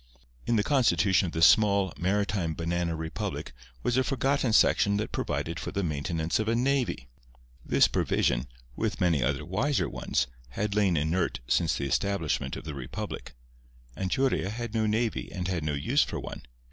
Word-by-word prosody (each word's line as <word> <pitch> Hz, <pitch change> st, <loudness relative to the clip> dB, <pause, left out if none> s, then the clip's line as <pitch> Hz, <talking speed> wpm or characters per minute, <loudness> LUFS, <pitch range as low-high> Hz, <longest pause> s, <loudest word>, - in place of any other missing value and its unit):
In 120 Hz, -, +2 dB
the 105 Hz, -, +3 dB
constitution 100 Hz, -, +3 dB
of -, -, -5 dB
this 80 Hz, 0 st, +5 dB
small, 100 Hz, -, +4 dB
maritime 95 Hz, -3 st, 0 dB
banana 85 Hz, 0 st, -1 dB
republic 80 Hz, -5 st, -4 dB, 0.3 s
was 120 Hz, -, +1 dB
a 130 Hz, -, +4 dB
forgotten 135 Hz, -1 st, +1 dB
section 100 Hz, -1 st, +4 dB
that 110 Hz, -, -3 dB
provided 85 Hz, +1 st, -2 dB
for -, -, -5 dB
the 100 Hz, -1 st, -2 dB
maintenance 80 Hz, +2 st, -1 dB
of 110 Hz, -, -1 dB
a 115 Hz, -, +2 dB
navy. 125 Hz, -, 0 dB, 0.6 s
This -, -, +4 dB
provision—with -, -, -1 dB
many 85 Hz, -6 st, +2 dB
other 70 Hz, +3 st, 0 dB
wiser 125 Hz, -, 0 dB
ones—had 60 Hz, +11 st, -3 dB
lain 100 Hz, -5 st, +2 dB
inert 80 Hz, 0 st, 0 dB
since 85 Hz, -3 st, +2 dB
the 70 Hz, -, -2 dB
establishment 100 Hz, +1 st, -1 dB
of -, -, -7 dB
the 75 Hz, -1 st, -6 dB
republic. 65 Hz, -2 st, -6 dB, 0.6 s
Anchuria 95 Hz, +2 st, 0 dB
had 115 Hz, +1 st, -5 dB
no 110 Hz, -1 st, +1 dB
navy 110 Hz, +1 st, -1 dB
and 90 Hz, -2 st, -3 dB
had 90 Hz, -4 st, -2 dB
no 75 Hz, -1 st, -1 dB
use 70 Hz, -, +2 dB
for -, -, -1 dB
one. -, -, -7 dB
90 Hz, 160 wpm, -28 LUFS, 80-110 Hz, 0.6 s, this